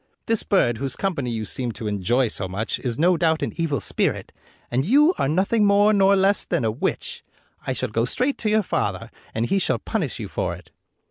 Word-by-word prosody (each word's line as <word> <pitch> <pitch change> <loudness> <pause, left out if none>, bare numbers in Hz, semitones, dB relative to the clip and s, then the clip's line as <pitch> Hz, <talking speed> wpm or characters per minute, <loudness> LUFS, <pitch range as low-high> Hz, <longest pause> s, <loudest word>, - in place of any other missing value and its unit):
This 225 -1 +2
bird, 120 - +1
whose 135 0 -3
company 160 -10 -2
you 110 -2 -3
seem 120 +2 -3
to 110 - -8
enjoy 105 +5 +1
so 95 - -3
much, 100 +5 -3
is 120 -3 -3
no 175 +2 +3
doubt 160 0 +1
an - - -3
evil 160 -6 0
spirit, 100 - -1 0.4
and 125 +2 +1
you 290 - +4
are 135 - +1
nothing 195 +7 +2
more 205 +1 +4
nor 195 -1 +4
less 195 +1 +3
than 165 -9 -1
a 110 - +1
witch. 115 - -3 0.4
I - - 0
shall - - -2
go 115 +2 0
straight 255 - -1
to 215 - 0
your 215 0 +3
father, - - -2 0.2
and 115 +1 0
he 195 +9 +1
shall - - +1
punish 175 - -3
you 105 - -5
for - - -3
it." - - -16
160 Hz, 215 wpm, -23 LUFS, -, 0.4 s, you